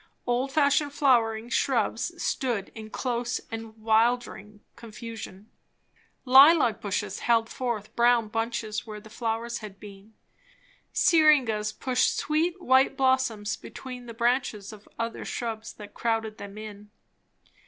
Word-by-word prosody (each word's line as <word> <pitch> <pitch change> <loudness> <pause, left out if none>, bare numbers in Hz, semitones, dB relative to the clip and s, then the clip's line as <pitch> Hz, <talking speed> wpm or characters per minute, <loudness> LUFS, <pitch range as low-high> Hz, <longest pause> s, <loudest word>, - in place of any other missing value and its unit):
Old 250 +3 0
fashioned 285 0 +2
flowering 235 -6 +2
shrubs 250 - 0
stood 235 -7 -2
in 220 -1 -9
close 240 +1 -2
and 225 0 -7
wildering 220 -2 0
confusion. 220 -3 -9 0.7
Lilac 270 -1 +6
bushes 200 -1 -3
held 225 -1 +2
forth 235 -5 -4
brown 235 -1 +3
bunches 225 0 -3
where 210 -1 -7
the 215 +1 -15
flowers 230 +1 -3
had 205 -3 -10
been. 205 +1 -13 0.8
Syringas 265 -10 +3
pushed 255 +2 0
sweet 330 +4 0
white 265 -3 +3
blossoms 260 -6 +1
between 250 -2 -9
the 230 - -9
branches 235 -4 -1
of 210 -1 -15
other 230 0 -4
shrubs 225 -2 -5
that 210 -1 -12
crowded 225 -2 -2
them 200 0 -9
in. 210 -1 -9
230 Hz, 120 wpm, -27 LUFS, 215-255 Hz, 0.8 s, Lilac